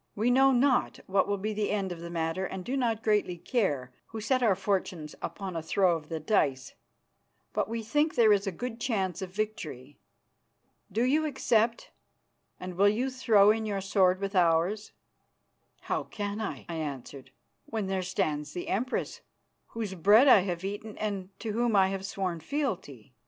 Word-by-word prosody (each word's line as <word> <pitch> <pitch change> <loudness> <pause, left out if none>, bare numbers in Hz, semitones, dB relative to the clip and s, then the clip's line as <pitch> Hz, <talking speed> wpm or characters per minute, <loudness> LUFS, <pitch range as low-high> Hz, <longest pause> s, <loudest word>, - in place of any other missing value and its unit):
We 225 +4 +2
know 270 +2 +5
not 260 +1 +2
what 195 +1 +2
will 200 0 0
be 215 +3 -3
the 210 0 -1
end 195 -3 -1
of 175 - -6
the 170 0 -7
matter 165 +2 -2
and 185 -1 -7
do 260 - -2
not 230 -4 0
greatly 210 -5 +1
care, 150 - -1 0.2
who 225 - -7
set 255 +4 +1
our 220 -6 +4
fortunes 185 -5 -2
upon 195 -3 -5
a 165 - -2
throw 175 +2 +2
of 155 -2 -8
the 165 -1 -3
dice, 140 -7 0 0.8
but - - -1
we 230 0 -3
think 295 +7 +1
there 220 -3 +6
is 200 0 0
a - - 0
good 235 +5 -6
chance 195 -7 -1
of 190 - -4
victory. 170 - -5 0.9
Do 225 +5 +1
you 305 +5 +2
accept, 230 -5 +1 0.7
and 185 0 -6
will 200 +1 +6
you 245 +6 -1
throw 220 -6 +5
in 220 +1 -1
your 200 -2 -1
sword 190 -1 +2
with 195 0 -4
ours?" 180 +4 +2 0.9
"How - - -2
can 205 0 -4
I," 215 - -5
I 170 -1 -4
answered, 140 -3 -6 0.4
"when 220 -3 -2
there 190 0 -1
stands 155 -5 -2
the 175 - -5
Empress, 250 +6 -2 0.5
whose 220 -4 -5
bread 205 - +6
I 250 - +8
have 180 -1 -3
eaten 205 +2 -6
and 200 -3 -3
to 225 - -3
whom 235 0 +1
I 190 -1 +5
have 195 0 -4
sworn 190 -4 -3
fealty?" 170 - -4
200 Hz, 180 wpm, -29 LUFS, 180-225 Hz, 0.9 s, I